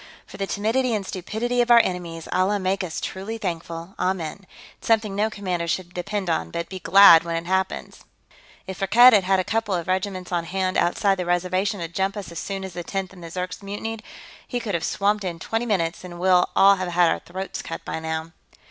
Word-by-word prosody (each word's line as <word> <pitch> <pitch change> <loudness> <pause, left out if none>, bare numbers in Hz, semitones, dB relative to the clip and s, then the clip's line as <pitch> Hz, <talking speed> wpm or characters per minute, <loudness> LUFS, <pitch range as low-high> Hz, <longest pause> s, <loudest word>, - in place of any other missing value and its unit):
"For - - -12
the 195 - -2
timidity 225 +5 0
and 200 -2 -3
stupidity 220 +7 -2
of 240 - 0
our 240 - +8
enemies, 175 -6 0
Allah 195 +3 +2
make 190 +1 -1
us 165 -3 -4
truly 200 +4 -5
thankful, 170 -2 -5
amen. 185 0 -2 0.3
It's - - -11
something 215 -3 +2
no 210 +2 +1
commander 185 -5 -3
should 175 +1 -3
depend 195 +2 -3
on, 85 - -1
but 170 - -4
be 190 0 -6
glad 180 -3 +8
when 170 0 -3
it 165 0 -3
happens. 190 +1 -2 0.7
If 190 0 -7
Firkked 195 +2 -2 0.2
had 205 -3 +5
had 190 0 +3
a - - +1
couple 215 -1 -1
of 170 -2 -3
regiments 185 -1 -2
on 170 -1 -1
hand 185 +1 -1
outside 195 +2 +2
the 180 - -2
reservation 185 +3 0
to 165 - -3
jump 190 +4 -2
us 200 -4 -6
as 170 - -6
soon 195 -1 -4
as 190 -1 -7
the 175 - -5
Tenth 195 +1 -4
and 180 -2 -13
the 165 - -7
Zirks 180 +3 -5
mutinied, 215 +3 -5 0.5
he 245 - -2
could 220 -4 -4
have 170 - -1
swamped 205 +1 0
us 185 - -1
in 170 - -8
twenty 225 +7 -3
minutes 170 -7 -1
and 175 -1 -9
we'll 180 0 +4
all 200 0 +6
have 185 -1 -3
had 175 0 +4
our - - -1
throats 190 +2 -6
cut - - -7
by - - -4
now." 160 0 -4
190 Hz, 225 wpm, -23 LUFS, 175-200 Hz, 0.7 s, our